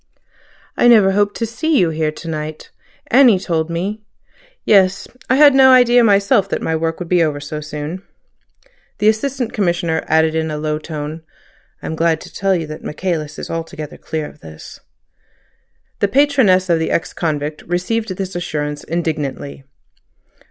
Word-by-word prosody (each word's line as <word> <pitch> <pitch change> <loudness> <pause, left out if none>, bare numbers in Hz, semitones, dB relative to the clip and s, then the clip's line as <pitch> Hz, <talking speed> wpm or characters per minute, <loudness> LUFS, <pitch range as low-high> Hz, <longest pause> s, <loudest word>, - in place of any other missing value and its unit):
"I - - +3
never 215 -5 +6
hoped 205 +1 +1
to 230 - -2
see 285 +7 -1
you 175 -7 +2
here 155 -1 -1
to 160 +2 -11
night. 155 -1 -6 0.4
Annie 245 -5 +6
told 170 -3 -2
me—" 190 +6 -3 0.6
"Yes. 195 -2 +3 0.2
I 260 - +4
had 290 0 +7
no 265 -1 +6
idea 245 -1 +6
myself 200 -1 +3
that - - -2
my 160 - -1
work 165 0 -2
would 180 - -6
be 180 0 +2
over 150 -3 0
so 150 +1 -6
soon." 150 +4 -6 1.0
The 210 - +1
Assistant 245 +2 -2
Commissioner 170 -5 0
added 160 0 +2
in 160 0 -1
a 150 - -4
low 150 0 -2
tone: 155 0 -6 0.6
"I - - -7
am 160 - -3
glad 165 0 +1
to - - -12
tell 195 -1 +1
you 165 -2 -2
that 155 0 -9
Michaelis 155 -2 -3
is - - -7
altogether 165 -2 -6
clear 160 -1 -4
of - - -16
this—" 80 - -12 1.2
The 200 - +2
patroness 255 -8 +3
of 170 -2 +2
the 160 - -1
ex 170 - -1
convict 150 -2 -3
received 195 +6 -1
this 190 -1 -5
assurance 150 -4 -4
indignantly. 150 -4 -4
170 Hz, 165 wpm, -18 LUFS, 155-205 Hz, 1.2 s, had